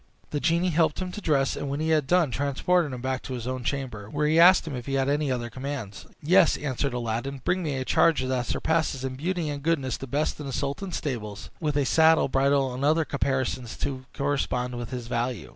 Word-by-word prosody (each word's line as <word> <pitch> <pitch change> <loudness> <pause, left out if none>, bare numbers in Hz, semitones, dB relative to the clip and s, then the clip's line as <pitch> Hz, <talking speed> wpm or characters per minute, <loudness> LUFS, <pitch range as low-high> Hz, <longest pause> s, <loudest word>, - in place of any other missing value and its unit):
The 150 - -1
genie 170 +4 +2
helped 160 -2 +2
him 185 -1 -3
to 210 - -7
dress, 140 -6 +1
and 140 - -4
when 140 +1 -2
he 160 +1 -1
had 155 -4 +2
done, 175 -4 +3
transported 145 +5 +1
him 125 -1 -6
back 130 0 -2
to 130 - -6
his 120 -2 -6
own 130 0 -3
chamber, 120 -7 -4
where 150 +4 -1
he 155 +2 +3
asked 180 +1 +7
him 155 -4 -5
if 125 -1 -7
he 135 - -1
had 135 0 +1
any 145 0 +1
other 120 -2 -3
commands. 130 -6 -6 0.2
"Yes," 180 +2 +5
answered 140 -2 -2
Aladdin; 120 +3 -3
"bring 185 +1 +1
me 150 -5 -2
a 130 - -3
charger 150 -3 +3
that 125 -2 -1
surpasses 160 -5 0
in 130 -1 -3
beauty 170 +3 -2
and 145 -1 -4
goodness 140 -5 0
the 135 - -7
best 145 +5 -1
in 145 - -6
the 135 - -5
sultan's 145 +8 -3
stables, 105 -9 -5
with 150 -3 -1
a 145 - +2
saddle, 160 +2 +4
bridle, 135 -1 +2
and 130 +2 -4
other 155 +2 +3
caparisons 130 -4 -2
to 130 -2 -4
correspond 130 -3 -1
with 120 -1 -5
his 125 -2 -5
value. 120 +1 -2
140 Hz, 230 wpm, -26 LUFS, 130-155 Hz, 0.2 s, asked